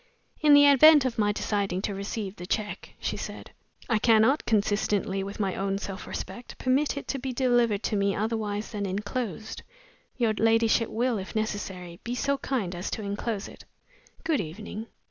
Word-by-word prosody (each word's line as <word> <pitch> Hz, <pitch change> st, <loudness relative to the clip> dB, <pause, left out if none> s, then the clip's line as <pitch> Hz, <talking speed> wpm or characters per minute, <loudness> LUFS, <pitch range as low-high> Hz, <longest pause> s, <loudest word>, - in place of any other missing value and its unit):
"In 300 Hz, -1 st, +6 dB
the 285 Hz, 0 st, +8 dB
event 285 Hz, +1 st, +8 dB
of 240 Hz, -3 st, -2 dB
my 205 Hz, -1 st, +3 dB
deciding 200 Hz, -3 st, -1 dB
to 205 Hz, -, -1 dB
receive 200 Hz, 0 st, -4 dB
the 180 Hz, -, -8 dB
check," 210 Hz, +1 st, -3 dB
she -, -, -2 dB
said, -, -, -7 dB, 0.4 s
"I 225 Hz, -3 st, +2 dB
cannot, 225 Hz, +6 st, +4 dB
consistently 205 Hz, -2 st, +1 dB
with 200 Hz, +3 st, -7 dB
my 195 Hz, -3 st, 0 dB
own 195 Hz, 0 st, -1 dB
self 195 Hz, -1 st, -6 dB
respect, 240 Hz, -, -7 dB
permit 275 Hz, +3 st, +1 dB
it 280 Hz, -, -6 dB
to 275 Hz, -, -1 dB
be 265 Hz, +1 st, -3 dB
delivered 240 Hz, -4 st, +2 dB
to 215 Hz, -, 0 dB
me 200 Hz, -1 st, +1 dB
otherwise 215 Hz, -1 st, -2 dB
than 205 Hz, -2 st, -3 dB
inclosed. 210 Hz, +2 st, -4 dB, 0.6 s
Your 230 Hz, -3 st, +2 dB
ladyship 225 Hz, +1 st, +3 dB
will 240 Hz, -1 st, 0 dB
(if 190 Hz, +4 st, -8 dB
necessary) 190 Hz, -5 st, -4 dB
be 240 Hz, +1 st, -3 dB
so 280 Hz, +2 st, 0 dB
kind 220 Hz, -10 st, -2 dB
as 175 Hz, +2 st, -4 dB
to 220 Hz, -, -4 dB
inclose 205 Hz, +1 st, -3 dB
it. -, -, -13 dB, 0.6 s
Good 320 Hz, -6 st, +1 dB
evening." 210 Hz, +6 st, -7 dB
215 Hz, 175 wpm, -27 LUFS, 200-245 Hz, 0.6 s, the